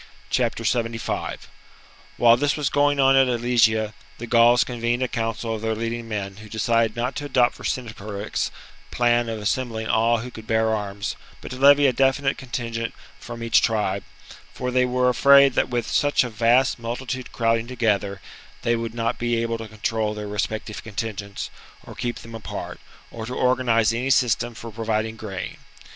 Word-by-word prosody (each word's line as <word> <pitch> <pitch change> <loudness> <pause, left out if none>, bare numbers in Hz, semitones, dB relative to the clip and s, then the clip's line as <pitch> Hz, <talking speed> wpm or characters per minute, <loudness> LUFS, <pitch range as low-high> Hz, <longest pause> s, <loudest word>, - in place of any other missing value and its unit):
75. 115 -1 -1 0.7
While 115 -1 +6
this 145 +4 0
was 145 -2 0
going 145 0 +2
on 135 0 +5
at 135 -1 +5
Alesia, 115 -3 +2 0.2
the 120 - -6
Gauls 120 +1 +5
convened 120 +1 -1
a - - 0
council 115 -1 -3
of 110 - -4
their 110 0 -1
leading 115 +1 -4
men, 100 -2 -4
who 110 0 -12
decided 115 0 +1
not 120 +2 -2
to 145 - -4
adopt 125 -4 +2
Vercingetorix's 110 -4 -3 0.4
plan 120 -1 +2
of 110 -1 -4
assembling 110 +1 -2
all 115 +2 +3
who 125 +2 -7
could 110 -2 -11
bear 110 0 +2
arms, 100 -1 -3 0.2
but - - -9
to 125 - -6
levy 140 +1 +7
a 130 - +4
definite 135 +2 +2
contingent 115 -3 -4 0.2
from 120 -1 -8
each 115 - +4
tribe; 105 -4 0 0.5
for 125 0 -3
they 125 0 +3
were 125 0 +1
afraid 140 +1 +6
that - - +1
with 120 -2 -1
such 145 -2 +2
a 125 - -5
vast 120 +4 +3
multitude 125 +2 -5
crowding 115 0 +1
together 105 -5 -1 0.4
they 120 - +2
would 115 0 -4
not 115 -1 -1
be 120 -1 0
able 115 0 -2
to 115 - -6
control 110 0 -2
their 105 0 -5
respective 105 +1 -3
contingents 105 -2 -5 0.3
or - - -10
keep 120 -1 -3
them 115 - -11
apart, 115 -1 -6 0.3
or 115 -1 -7
to 125 - -5
organize 120 -3 +2
any 125 +3 -1
system 120 -2 +2
for 115 0 -8
providing 110 0 -2
grain. 100 -4 -6
115 Hz, 170 wpm, -23 LUFS, 110-125 Hz, 0.7 s, levy